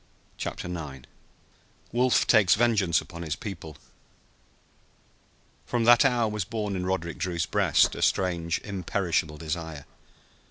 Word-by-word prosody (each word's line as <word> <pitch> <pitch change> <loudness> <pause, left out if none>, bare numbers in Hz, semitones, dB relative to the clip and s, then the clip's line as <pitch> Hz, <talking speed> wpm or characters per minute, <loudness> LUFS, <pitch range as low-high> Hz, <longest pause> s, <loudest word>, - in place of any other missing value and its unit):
CHAPTER - - -5
IX 75 -7 -7 0.9
WOLF 125 +1 +3
TAKES 100 -3 +5
VENGEANCE 105 -7 +2
UPON 85 0 -10
HIS 80 -3 -3
PEOPLE 80 -7 -8 1.9
From 120 -1 0
that 120 +3 +7
hour 120 -4 +2
was 105 -1 -2
born 105 0 -3
in 90 0 -3
Roderick 85 -3 -2
Drew's 85 -3 -1
breast - - +3
a - - -6
strange, 85 -3 +1
imperishable 90 -5 -2
desire. 80 -2 -5
90 Hz, 120 wpm, -27 LUFS, 80-105 Hz, 1.9 s, that